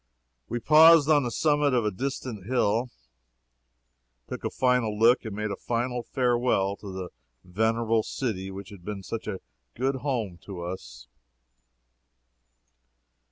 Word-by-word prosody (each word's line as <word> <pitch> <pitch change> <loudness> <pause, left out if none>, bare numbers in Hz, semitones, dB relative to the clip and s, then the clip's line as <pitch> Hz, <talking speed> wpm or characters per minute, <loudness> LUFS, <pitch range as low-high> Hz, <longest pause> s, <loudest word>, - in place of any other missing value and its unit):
We 120 - -2
paused 155 +3 +7
on 145 -1 +5
the 125 - -2
summit 145 0 +2
of 120 -3 +1
a 105 - +1
distant 125 -3 -5
hill 115 -4 +2
and 125 +1 -6 1.4
took - - -6
a - - -1
final 125 -4 +1
look 115 +4 +4
and 110 -3 -5
made 105 0 -3
a - - -2
final 120 +3 -2
farewell 120 -6 +1
to 100 - -9
the 95 -1 -6 0.3
venerable 110 +3 +1
city 105 -5 -4
which 95 0 -8
had 100 -4 -13
been 100 0 -6
such 115 +3 -6
a 95 - -4 0.3
good 135 +1 0
home 120 -10 -3
to 95 -4 -7
us. 85 -8 -8
115 Hz, 145 wpm, -27 LUFS, 100-130 Hz, 1.4 s, paused